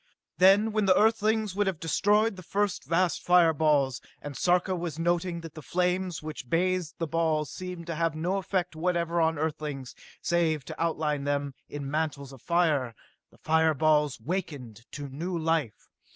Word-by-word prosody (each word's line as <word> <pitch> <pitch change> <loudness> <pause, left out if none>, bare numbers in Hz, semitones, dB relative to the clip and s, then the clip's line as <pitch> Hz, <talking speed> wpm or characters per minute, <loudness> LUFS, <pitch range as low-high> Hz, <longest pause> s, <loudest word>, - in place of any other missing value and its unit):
Then, 195 +4 +6
when 215 -1 +1
the 185 -1 +5
Earthlings 220 -1 +2
would 205 +1 0
have 185 -5 -1
destroyed 205 +7 +2
the 185 - -9
first 200 0 -1
of - - -24
the 165 - +1
vast 180 -2 +1
fire 175 -2 +5
balls 140 -4 +2 0.2
and 145 -1 -8
Sarka 180 +3 +2
was 170 -3 -4
noting 175 +1 0
that 165 -2 -9
the 155 - -9
flames 180 +1 -1
which 150 -5 -7
bathed 180 0 0
the 165 - -1
balls 155 -2 0
seemed 180 -2 -7
to 170 - -4
have 165 -1 0
no 175 +5 -1
effect 185 -3 -2
whatever 170 0 0
on 160 -1 +2
Earthlings, 150 -4 -4 0.3
save 160 -5 0
to - - -7
outline 150 -3 -1
them 145 -1 -1 0.2
in 140 -1 -5
mantles 145 -3 -2
of 130 - -13
fire 150 -7 +1 0.3
the - - -23
fire 160 0 +2
balls 150 -3 +2
wakened 130 - -5
to 145 -1 -5
new 170 +7 -4
life. 160 -8 -1
165 Hz, 180 wpm, -28 LUFS, 150-180 Hz, 0.3 s, Then